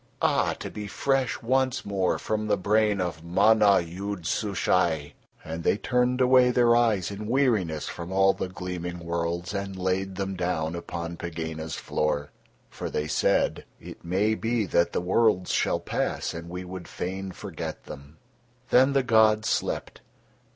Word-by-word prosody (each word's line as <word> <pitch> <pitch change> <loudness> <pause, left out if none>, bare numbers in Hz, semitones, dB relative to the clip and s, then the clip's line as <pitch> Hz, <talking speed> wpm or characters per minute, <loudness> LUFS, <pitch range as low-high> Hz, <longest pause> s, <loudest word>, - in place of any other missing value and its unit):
Ah! - - +2
to - - -7
be 105 -1 -6
fresh 135 +4 0
once 130 +2 +1
more 95 -2 0
from 110 0 -2
the 105 - +2
brain 105 +1 +2
of 85 -3 -3
Mana 100 +3 +4
Yood 90 +2 -6
Sushai." 80 -6 0 0.3
And 80 +1 -5
They - - +2
turned 125 +3 +1
away 125 0 +6
Their 120 -1 +4
eyes 110 -6 +2
in 105 +1 -6
weariness 110 - +1
from 85 +1 -6
all 95 0 +4
the 95 - -4
gleaming 90 -1 -5
worlds 85 +2 -3
and 100 -1 -4
laid 95 +1 -1
Them 95 0 -3
down 85 -3 -1
upon 85 0 -5
Pegāna's 80 -2 -5
floor, 75 -1 -2 0.4
for - - -6
They 75 - -2
said: - - +1
"It - - -11
may 95 +5 +1
be 115 0 0
that 85 -1 +2
the - - -1
worlds 95 0 +2
shall - - +1
pass - - -2
and 85 0 -7
we 90 +1 -5
would 90 -1 -8
fain 95 +1 -5
forget - - -7
them." 70 +3 -11 0.5
Then 130 +2 +5
the 135 -1 +3
gods 110 -2 +4
slept. - - -2
95 Hz, 160 wpm, -26 LUFS, 85-110 Hz, 0.5 s, away